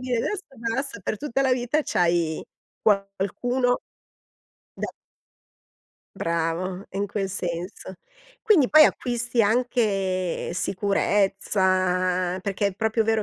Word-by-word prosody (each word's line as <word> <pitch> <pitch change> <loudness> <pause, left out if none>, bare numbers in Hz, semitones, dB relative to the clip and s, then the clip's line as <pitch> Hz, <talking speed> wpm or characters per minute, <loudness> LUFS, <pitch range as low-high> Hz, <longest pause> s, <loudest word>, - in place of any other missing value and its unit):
dire: 255 -1 -1
"Adesso 390 - -2
basta, 230 +1 -2
per 215 - -3
tutta 275 0 -1
la 265 -1 +3
vita, 250 +5 +1
c'hai 170 -2 +1 0.4
qualcuno 210 +5 +1 1.0
da" - - -4 1.3
Bravo, 170 +3 -2
in 200 +1 -2
quel 195 -1 -2
senso. 180 0 -5 0.5
Quindi 370 - +4
poi 310 0 +8
acquisti 240 -3 +1
anche, 205 -6 0
sicurezza, 185 -1 +1
perché 200 +1 0
è 190 - -8
proprio 220 +2 +1
vero 220 -1 +1
200 Hz, 105 wpm, -25 LUFS, 185-240 Hz, 1.3 s, poi